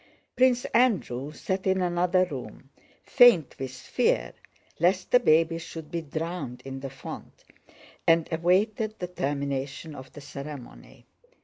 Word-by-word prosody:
Prince 250 -1 +3
Andrew 180 - +2
sat 190 +4 -3
in 190 0 +2
another 180 +1 +2
room, 135 -3 -9 0.3
faint 240 - +5
with 130 -1 -4
fear 130 - 0 0.5
lest 185 +2 +2
the 250 - +7
baby 165 -5 +3
should 160 -2 -9
be 170 - -2
drowned 160 -4 -5
in 135 0 -6
the 135 0 -6
font, 135 -1 -10 0.6
and 165 -1 +4
awaited 205 +6 +1
the 180 - -3
termination 140 -2 -3
of 130 -2 -10
the 145 - -10
ceremony. 140 -2 -10
165 Hz, 130 wpm, -27 LUFS, 140-185 Hz, 0.6 s, the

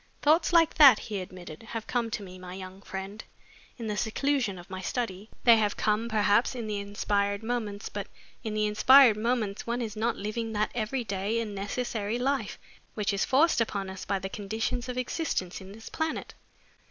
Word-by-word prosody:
"Thoughts 315 +4 +4
like 330 -2 +5
that," 275 -7 +10
he 205 -4 -4
admitted, 180 -4 -9
"have 225 0 -6
come 235 -2 -1
to 215 - -4
me, 185 -1 -10
my 180 0 -8
young 190 0 -9
friend, 195 +2 -7 0.5
in 235 - -6
the 210 -1 -2
seclusion 235 0 0
of 175 - -11
my 190 0 -6
study. 210 -2 -3
They 235 -2 +8
have 210 -2 0
come, 215 +2 +1
perhaps, 215 +3 +3
in 235 -2 -4
the 210 -1 -2
inspired 200 0 -1
moments, 220 -3 -3
but - - -5 0.4
in 220 -2 -3
the 215 0 +1
inspired 235 +3 +7
moments 220 -2 -1
one 235 +1 -1
is 225 -3 -4
not 230 +2 0
living 220 +2 -3
that 210 0 0
every 240 +2 -2
day 200 +2 -1
and 220 -3 -3
necessary 210 +2 -2
life 270 +3 -1 0.4
which 210 -1 0
is 200 - +1
forced 280 -1 +3
upon 200 -4 -2
us 190 - -7
by 195 - -1
the 190 0 -4
conditions 220 +5 -3
of 250 - -4
existence 250 - -2
in 190 0 -11
this 220 +2 -11
planet. 320 0 -3
215 Hz, 190 wpm, -28 LUFS, 200-240 Hz, 0.5 s, that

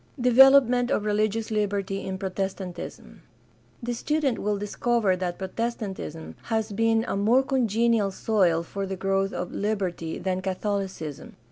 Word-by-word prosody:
Development 250 0 +6
of 215 -6 0
religious 215 +1 0
liberty 200 -2 -1
in 190 0 -4
Protestantism.— 190 -1 -5 0.6
The 240 +1 -2
student 290 +1 0
will 210 0 0
discover 205 0 +1
that 180 -1 -3
Protestantism 190 -5 -4
has 220 -1 -1
been 225 +2 +2
a - - -1
more 225 +7 +3
congenial 230 -5 +2
soil 185 -5 +1
for 195 +3 -5
the 190 - -3
growth 195 +1 0
of 180 - -4
liberty 190 -6 -2
than 185 0 -2
Catholicism. 190 -6 -4
205 Hz, 130 wpm, -26 LUFS, 190-230 Hz, 0.6 s, Development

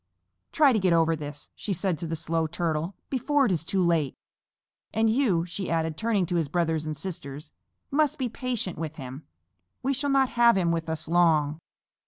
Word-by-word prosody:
"Try 290 -4 +5
to 220 - +2
get 185 -3 +3
over 165 0 +3
this," 145 -1 -8
she 205 - -3
said 180 -3 -1
to 170 - -4
the 165 - -2
Slow 165 +1 -1
Little 160 0 -3
Turtle, 165 +1 -1 0.2
"before 280 +2 +2
it 225 - +1
is 165 -4 0
too 185 +3 0
late. 165 -6 +1 0.8
And 220 0 +3
you," 215 -10 +2
she 180 +1 -4
added, 160 -1 0
turning 215 -1 +1
to 175 +1 -1
his 165 -3 0
brothers 160 -1 0
and 155 -1 -3
sisters, 145 -4 -6 0.4
"must 295 0 +2
be 255 - -1
patient 235 -6 -3
with 160 -1 -4
him. 135 0 -8 0.6
We 270 +2 +1
shall 285 +2 -1
not 270 -2 +3
have 235 -3 +4
him 175 -3 +2
with 165 -1 -2
us 160 0 -2
long." 160 -3 +3
170 Hz, 200 wpm, -27 LUFS, 160-220 Hz, 0.8 s, Try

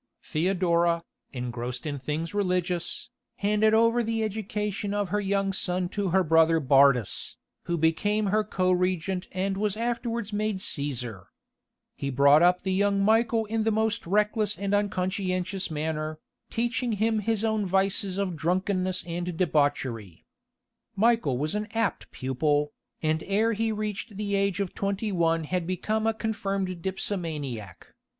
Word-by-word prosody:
Theodora, 170 0 +1 0.3
engrossed 125 0 -5
in 145 -2 -3
things 155 +6 -3
religious, 180 -3 -1 0.2
handed 210 +2 +3
over 230 +2 +4
the 225 -1 -1
education 210 -1 -3
of 205 -2 -1
her 205 +2 0
young 195 0 0
son 180 -1 -1
to 200 +1 -2
her 190 +2 +3
brother 165 0 +4
Bardas, 135 -5 +3 0.3
who 170 -1 -1
became 205 +7 +1
her 215 0 +3
co 185 -3 0
regent 180 0 0
and 190 +1 -1
was 210 0 0
afterwards 235 -2 -2
made 210 -1 -1
Caesar. 125 - -3 0.7
He 140 - -3
brought 140 +3 +5
up 180 +1 +4
the 190 0 0
young 200 +1 +2
Michael 225 +1 +3
in 220 +1 -1
the 225 - +2
most 220 -2 0
reckless 210 +2 +1
and 200 0 -2
unconscientious 185 -1 -1
manner, 155 0 -3 0.3
teaching 240 0 -1
him 220 +1 +1
his 220 0 0
own 220 -2 0
vices 190 0 +1
of 195 -3 -1
drunkenness 185 +2 0
and 175 0 -4
debauchery. 140 - 0 0.7
Michael 215 - +2
was 150 +4 -1
an 210 0 -2
apt 225 -2 -1
pupil, 145 +3 0 0.3
and 155 0 +1
ere 215 +4 +2
he 225 +1 0
reached 210 0 -4
the 205 -1 -2
age 200 -1 +1
of 195 -3 -2
twenty 200 +2 -2
one 165 -2 +1
had 175 +2 -2
become 215 +4 -1
a 225 - +2
confirmed 195 -5 -2
dipsomaniac. 155 - -4
190 Hz, 145 wpm, -27 LUFS, 165-210 Hz, 0.7 s, brought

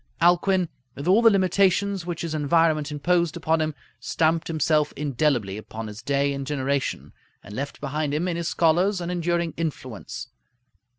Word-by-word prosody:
Alcuin, 175 +2 +3 0.3
with 140 +4 -6
all 195 +5 +5
the 230 - +7
limitations 195 -1 +2
which 175 -2 -3
his 165 -2 -3
environment 155 0 +2
imposed 170 +3 +1
upon 160 -1 +1
him, 155 -1 -1 0.2
stamped 165 0 0
himself 155 -2 +1
indelibly 135 -8 0
upon 110 +1 -7
his 105 +1 -8
day 140 0 +1
and 140 -1 -5
generation, 140 -1 -2 0.3
and 105 +3 -10
left 140 +3 -5
behind 150 +1 -2
him, 155 +5 0
in 175 - -1
his 170 0 -2
scholars, 175 +5 +2
an 175 0 -3
enduring 170 -1 -1
influence. 135 -9 -5
160 Hz, 160 wpm, -24 LUFS, 140-175 Hz, 0.3 s, the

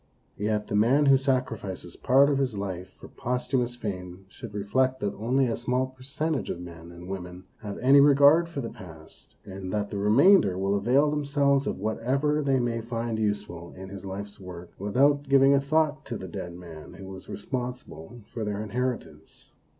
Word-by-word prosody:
Yet 105 0 0
the - - -3
man 125 +8 +4
who 135 -1 +7
sacrifices 120 -9 -2
part 135 +2 +4
of 140 - +1
his 130 -5 -1
life 95 -2 -5
for - - -11
posthumous 125 0 -2
fame 95 -4 -6
should 115 +2 -10
reflect 130 +6 +1
that 100 -1 -2
only 125 +5 +1
a 115 - -1
small 125 +2 0
percentage 135 +3 -3
of - - -4
men 85 -1 -10
and 85 +1 -11
women 90 -1 -7 0.2
have 105 -3 -6
any 135 +3 +6
regard 145 +4 +6
for 145 -4 -4
the 115 - -5
past, 80 -5 -13
and 95 -1 -7
that 105 0 -1
the 100 - -4
re 105 +1 +1
mainder 125 - +5
will 95 +1 0
avail 125 +9 +3
themselves 140 -1 +1
of - - -2
whatever 135 +8 0
they 135 -2 +2
may 120 -1 -1
find 115 -1 -3
useful 100 -5 -3
in 95 0 -8
his 100 +1 -9
life's 100 +1 -7
work, 90 -2 -10
with 100 +4 -4
out 145 +1 +3
giving 135 0 +6
a 140 - +3
thought 155 +1 +1
to 115 - -4
the 95 - -8
dead 85 0 -6
man 85 -3 -11
who 95 - -10
was 95 0 -10
responsible 120 -3 -6
for 115 - -3
their 105 0 -3
inheritance. 125 +4 -5
115 Hz, 190 wpm, -27 LUFS, 95-135 Hz, 0.2 s, who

